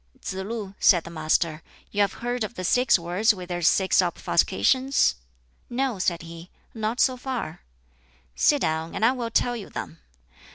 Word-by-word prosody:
"Tsz - - -5
lu," 195 +1 -5
said 175 -4 +5
the 170 - -9
Master, 155 0 0 0.3
"you 205 - 0
have 200 0 +2
heard 245 -1 -1
of 215 +3 -5
the 185 - -5
six 245 +5 +4
words 180 +6 +1
with 180 -1 -9
their 175 0 -3
six 190 +3 +4
obfuscations?" 265 +1 +2 0.6
"No," 245 -3 -1
said 170 -2 -1
he, 165 +1 -10 0.2
"not 225 +2 -3
so 255 - +3
far." 250 -11 -5 0.7
"Sit 290 - +3
down, 160 +1 -2
and 220 - +1
I 240 - +5
will 245 -3 -3
tell 245 +1 +1
you 215 -4 -8
them. 80 -1 -7
200 Hz, 170 wpm, -25 LUFS, 170-240 Hz, 0.7 s, said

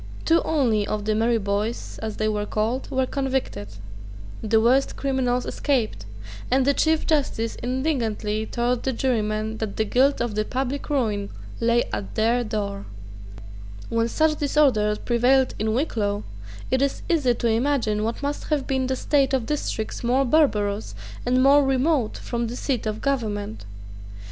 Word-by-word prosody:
Two 330 +1 +4
only 235 -9 +1
of 210 -1 -3
the 215 - +1
Merry 230 +2 +2
Boys, 205 +2 -3
as 220 -1 -4
they 215 - 0
were 210 -1 -1
called, 225 +5 -1
were 260 -1 +1
convicted: 265 - -2 0.7
the 220 0 +3
worst 255 +5 +3
criminals 255 -2 0
escaped; 220 - -1 0.4
and 260 +1 +3
the 280 - +4
Chief 315 +2 +2
justice 270 -7 0
indignantly 235 -5 -1
told 240 0 0
the 265 - -1
jurymen 220 -3 -1
that 220 -2 -4
the 220 - +1
guilt 265 +6 +3
of 235 -2 -1
the 215 +1 0
public 265 +5 -3
ruin 215 -8 0 0.3
lay 235 +1 +3
at 100 -2 -4
their 235 +3 +2
door, 200 -3 -4 1.0
When 230 0 +1
such 310 +5 +1
disorder 265 -8 +3
prevailed 250 +4 +2
in 215 +1 0
Wicklow, 210 -7 -1 0.5
it 260 0 +2
is 280 0 0
easy 285 -8 +2
to 235 - -1
imagine 225 -2 +1
what 230 +5 -3
must 285 +1 -2
have 295 -3 0
been 265 -1 0
the 260 - 0
state 275 0 +2
of 250 -4 -1
districts 265 -7 -3
more 255 +3 +2
barbarous 220 -8 +1 0.3
and 255 +1 +3
more 280 +1 +6
remote 270 -2 +1
from 235 -1 -3
the 235 - -5
seat 255 -3 -2
of 215 0 -3
government. 205 - -2
240 Hz, 160 wpm, -24 LUFS, 215-270 Hz, 1.0 s, more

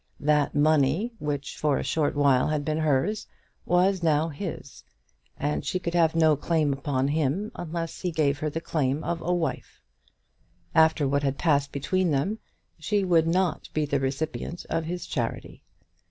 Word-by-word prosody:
That 150 0 +2
money 155 - +2
which 145 -1 -3
for 150 -2 +1
a - - -2
short 150 -2 0
while 140 -3 +3
had 150 -1 -1
been 155 0 -1
hers 155 +8 0 0.4
was 185 +1 +3
now 160 -1 +2
his; 155 -3 -7 0.5
and 145 +2 -1
she - - -1
could 170 -2 -4
have 165 -2 +3
no 160 -2 +5
claim 150 -1 +1
upon 135 -1 -1
him 160 +8 0
unless 165 -1 -5
he 180 - -1
gave 145 -3 +1
her 155 - -1
the 165 +2 -4
claim 145 -3 -1
of 170 -1 -2
a 175 - -1
wife. 165 -6 -2 0.9
After 160 -2 +4
what 140 +1 +1
had 140 -1 -1
passed 140 -4 +1
between 180 +6 0
them 155 +10 0 0.4
she 200 +5 0
would 170 -3 +3
not 180 +1 0
be 155 -1 +1
the 140 -1 0
recipient 155 +5 -3
of 165 0 0
his 175 +1 -4
charity. 120 -9 -4
155 Hz, 170 wpm, -26 LUFS, 145-170 Hz, 0.9 s, no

